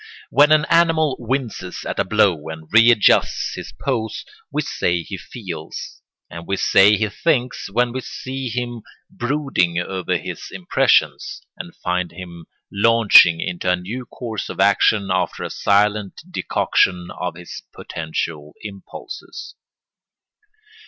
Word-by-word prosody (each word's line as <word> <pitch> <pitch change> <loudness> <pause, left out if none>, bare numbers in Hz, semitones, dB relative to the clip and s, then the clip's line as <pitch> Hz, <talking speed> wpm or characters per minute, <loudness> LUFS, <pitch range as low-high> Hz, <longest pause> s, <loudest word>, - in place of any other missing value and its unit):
When 150 +1 +5
an 155 -1 +5
animal 165 -4 +3
winces 120 -6 -4
at - - -4
a - - +3
blow 95 -6 +1
and 80 0 -8
readjusts 115 -1 +4
his - - -7
pose, 110 - -3 0.3
we 150 - -1
say 85 -9 -1
he 95 - -7
feels; 85 -10 -8 0.3
and 85 0 -10
we 100 - -1
say 100 +3 +5
he 110 - 0
thinks 125 - -1
when 120 +4 +1
we 130 - -3
see 130 +1 -6
him 120 0 -4 0.3
brooding 120 - -1
over 90 +1 -1
his - - -7
impressions, 95 -3 +1
and 85 - -9
find 90 -1 -2
him 85 -2 -10 0.2
launching 100 -5 +6
into 90 0 -3
a - - +3
new 110 +8 -7
course 110 -5 -6
of - - -7
action 100 0 +3
after 90 -2 -1
a - - -5
silent 105 0 +1
decoction 90 - 0
of 90 -2 -5
his 90 0 -9
potential 80 -1 -5
impulses. 100 -2 -9
100 Hz, 130 wpm, -20 LUFS, 90-120 Hz, 0.3 s, launching